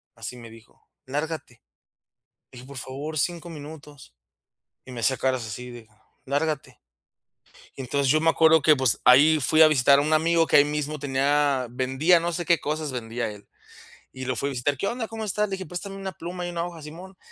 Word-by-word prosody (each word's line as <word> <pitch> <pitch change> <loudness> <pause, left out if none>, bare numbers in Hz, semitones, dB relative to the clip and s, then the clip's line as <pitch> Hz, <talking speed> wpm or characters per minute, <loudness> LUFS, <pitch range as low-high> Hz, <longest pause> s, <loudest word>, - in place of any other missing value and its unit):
así 125 - -8
me 115 -1 -11
dijo: 115 +1 -19 0.2
"lárgate", 145 -2 -5 0.9
le - - -13
dije: 125 - -12
"Por 140 -1 -10
favor, 140 +5 -6
5 170 +2 -2
minutos", 150 - -11 0.7
y - - -12
me 120 - -6
hacía 130 +3 +1
caras 130 -3 -1
así 125 +4 -7
de 120 -2 -11 0.4
"lárgate", 145 +1 -3 1.0
y 135 - -6
entonces 135 +1 0
yo 155 +2 +3
me 165 +1 +4
acuerdo 160 -1 +4
que, 155 +1 +6
pues, 130 -5 +1
ahí 145 +6 +6
fui 155 +4 +4
a 155 - +8
visitar 140 -1 +4
a - - +1
un 155 +2 -1
amigo 165 +1 +3
que - - +4
ahí 145 - +7
mismo 150 0 -3
tenía, 140 -1 +1
vendía 130 +8 +2
no 170 +1 -2
sé 175 +1 -3
qué 170 -1 +3
cosas 155 0 -3
vendía 120 -2 -4
él, 105 -1 -13 0.7
y 130 0 -8
lo 130 0 -2
fue 140 +5 -2
a - - -4
visitar: 135 +2 -1
"¿Qué 195 - -2
onda?, 235 0 -3
¿cómo 225 0 -6
estás?", 210 0 -1
le 195 - -6
dije: 190 -2 -5
"Préstame 195 +4 -6
una 195 -1 -6
pluma 175 +1 -6
y - - -4
una 170 -1 -3
hoja", 170 -2 -9
simón, 175 +5 -11
150 Hz, 210 wpm, -25 LUFS, 130-165 Hz, 1.0 s, a